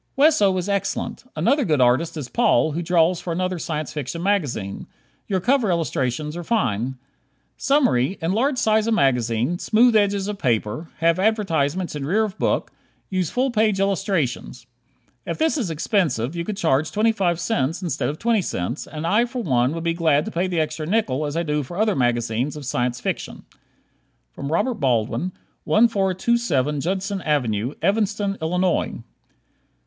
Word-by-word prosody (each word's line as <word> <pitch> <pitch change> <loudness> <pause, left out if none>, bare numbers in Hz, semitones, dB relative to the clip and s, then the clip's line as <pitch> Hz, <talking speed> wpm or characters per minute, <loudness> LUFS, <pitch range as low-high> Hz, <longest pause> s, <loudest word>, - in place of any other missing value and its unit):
Wesso 265 -10 +4
is 180 +1 -2
excellent. 200 +4 -2
Another 280 +5 +2
good 155 - +1
artist 130 +7 +2
is 145 -5 -4
Paul, 225 - +2
who 165 +4 -2
draws 170 0 +2
for 175 - -4
another 185 +1 -1
Science 155 -2 -4
Fiction 150 +3 -4
magazine. 150 - -1 0.4
Your 190 -2 0
cover 245 +2 +2
illustrations 150 -3 -1
are 175 - -5
fine. 130 - 0 0.6
Summary: 200 - +2
Enlarge 225 - 0
size 220 -1 +2
of 230 - +2
magazine, 125 - +1
smooth 235 +1 +4
edges 200 -2 +2
of 210 -1 -4
paper, 120 +5 -1
have 165 +2 +3
advertisements 185 -6 0
in 145 - -4
rear 200 +10 +2
of 205 -3 -4
book, - - 0 0.4
use 185 -3 0
full 260 +1 0
page 215 -3 +2
illustrations. 180 - -1 0.6
If - - -2
this 320 0 +1
is 240 - -1
expensive, 155 - 0
you 170 0 -3
could 205 +1 -4
charge 155 -6 +1
twenty 220 +2 +2
five 180 -6 0
cents 175 - -1
instead 165 -6 -1
of 150 - -4
twenty 230 0 +1
cents, 115 - -3
and 155 0 -6
I, 210 +7 +3
for 245 0 -5
one, 125 - +2
would 165 0 -4
be 170 0 +1
glad 160 -3 +2
to - - -5
pay 175 +3 0
the 175 -3 -1
extra 155 0 -2
nickel 155 -8 0
as 145 +2 -4
I 170 - +1
do 150 -2 0
for 160 +6 -8
other 215 -1 +2
magazines 120 +2 0
of 145 - -8
Science 125 -1 -1
Fiction. - - -4 0.9
Robert 165 - -1
Baldwin, 125 +7 0 0.3
1427 190 - +2
Judson 190 +4 -2
Ave., 125 -6 0
Evanston, 205 +1 0
Illinois. 180 +2 0
170 Hz, 165 wpm, -22 LUFS, 145-205 Hz, 0.9 s, Wesso